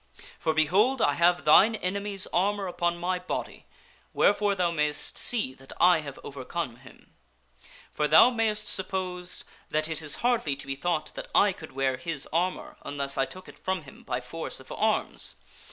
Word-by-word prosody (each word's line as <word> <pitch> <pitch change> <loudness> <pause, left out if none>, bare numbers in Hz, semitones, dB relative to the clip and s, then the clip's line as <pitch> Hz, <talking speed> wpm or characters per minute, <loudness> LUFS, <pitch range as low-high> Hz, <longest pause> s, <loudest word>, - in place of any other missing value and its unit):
For, 160 - 0
behold! 200 - +3
I 145 - +3
have 175 +1 +3
thine 200 +9 +7
enemy's 200 0 -2
armor 200 +2 +1
upon 175 -1 -1
my 180 +1 -1
body, 180 - -5 0.5
wherefore 205 0 +3
thou 180 -2 +1
mayst 150 -2 -1
see 215 - +1
that 135 0 -14
I 180 -2 +6
have 140 -3 -8
overcome 140 -1 -5
him. 130 +1 -17 0.8
For 150 - 0
thou 160 +11 +7
mayst 220 -3 0
suppose 180 -1 -3 0.3
that 155 0 0
it 160 -1 -3
is 150 -2 -1
hardly 230 - +2
to 140 - -9
be 135 - -2
thought 160 +2 -2
that - - -7
I 200 -1 +5
could 155 -5 -11
wear 135 -1 0
his 160 -1 -5
armor 180 +3 -1
unless 140 -1 -2
I 135 - +2
took 185 +6 -11
it - - -14
from 190 -3 -2
him 135 - -14
by 125 0 -3
force 160 +6 -5
of - - -13
arms. - - -1
170 Hz, 175 wpm, -28 LUFS, 145-190 Hz, 0.8 s, thine